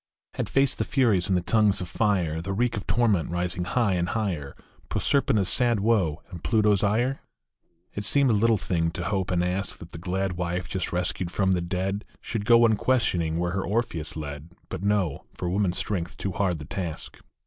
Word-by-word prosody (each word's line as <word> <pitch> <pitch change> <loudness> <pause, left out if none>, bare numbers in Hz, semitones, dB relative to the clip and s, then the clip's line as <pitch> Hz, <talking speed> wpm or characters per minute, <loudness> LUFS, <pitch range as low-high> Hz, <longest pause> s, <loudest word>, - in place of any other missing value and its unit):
Had - - -3
faced 135 -1 +2
the - - +2
Furies 115 -10 +2
and 95 - +2
the 90 - -2
tongues 105 -1 +3
of 90 - -4
fire, 90 -7 0
The 95 +3 -3
reek 120 +3 0
of 105 - -5
torment, 110 -8 +2
rising 90 0 -1
high 110 0 +1
and 90 -1 0
higher, 90 -11 -2 0.3
Proserpina 135 -7 +2
s 95 - +1
sad 120 -3 +2
woe 95 -8 +1
and 85 - -9
Pluto 110 -2 +3
s 100 - +2
ire? 120 +6 +1 0.7
It 105 - -4
seemed 140 +4 +4
a - - +3
little 110 +1 +3
thing 85 -3 0
to - - -4
hope 95 -2 -1
and 90 -1 +1
ask 90 +3 -1
That 85 - -12
the 85 - -8
glad 95 +2 -1
wife, 90 0 -2
just 95 -1 -2
rescued 90 0 -1
from 95 +1 +1
the 90 -2 +2
dead, 95 +4 -2 0.2
Should 110 -3 -4
go 120 +1 +6
unquestioning 105 -8 +1
where 90 +1 0
her 95 +1 -1
Orpheus 100 -8 -2
led. 75 +2 -7 0.2
But - - -5
no; 100 -7 0
for 90 - -4
woman 95 +2 +1
s - - -4
strength 90 -5 -3
too 100 - -3
hard 90 -2 0
the 75 - -8
task. 85 -1 -5
95 Hz, 205 wpm, -26 LUFS, 85-110 Hz, 0.7 s, go